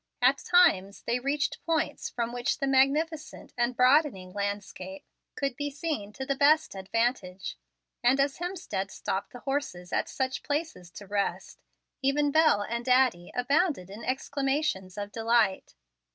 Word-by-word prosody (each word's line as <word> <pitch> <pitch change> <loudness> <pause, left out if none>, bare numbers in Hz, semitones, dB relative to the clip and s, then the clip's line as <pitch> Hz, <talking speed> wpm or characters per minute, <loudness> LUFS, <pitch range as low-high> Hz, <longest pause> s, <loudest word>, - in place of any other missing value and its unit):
At 260 +3 +4
times 205 - +3
they 240 +1 0
reached 280 +3 -1
points 320 -1 -1
from 235 0 -3
which 245 0 -1
the 275 - -1
magnificent 295 +4 +1
and 240 0 0
broadening 250 - +3
landscape 200 -2 -4 0.3
could 275 -3 -2
be 290 +2 -2
seen 285 -8 -4
to 265 - -5
the 275 - +1
best 305 +3 +3
advantage, 195 -1 -2 0.5
and 250 +3 +4
as 275 0 +1
Hemstead 350 - -3
stopped 195 +1 -3
the 245 - -10
horses 270 -11 -3
at - - 0
such 260 -1 -2
places 295 - -3
to 205 - -9
rest, 200 0 -3 0.4
even 285 +2 +2
Bel 310 -9 +4
and 235 +3 -3
Addie 250 -9 +3
abounded 255 - +1
in 215 +3 -9
exclamations 270 - -1
of 205 0 -4
delight. 225 - +1
250 Hz, 145 wpm, -28 LUFS, 200-285 Hz, 0.5 s, At